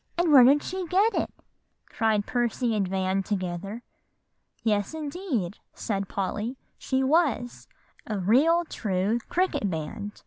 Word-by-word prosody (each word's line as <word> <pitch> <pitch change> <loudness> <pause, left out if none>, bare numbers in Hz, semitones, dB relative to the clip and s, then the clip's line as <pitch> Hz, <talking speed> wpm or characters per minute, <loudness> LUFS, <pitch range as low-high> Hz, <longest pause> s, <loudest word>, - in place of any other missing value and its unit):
And 345 -2 +2
where 260 -3 +10
did 280 +4 +5
she 370 -1 -4
get 400 +6 +3
it?" - - -1 0.6
cried 215 -2 0
Percy 240 -1 0
and 200 -3 0
Van 190 +1 0
together. 195 +3 -4 0.8
"Yes, 210 +4 0
indeed," 285 - -3 0.2
said 195 -3 -3
Polly; 210 +6 -3 0.2
"she 265 0 0
was 275 -4 +1 0.4
a 215 -3 -2
real 275 - +4
true 205 - -1
cricket 360 - 0
band. 175 +5 -5
225 Hz, 130 wpm, -26 LUFS, 195-290 Hz, 0.8 s, where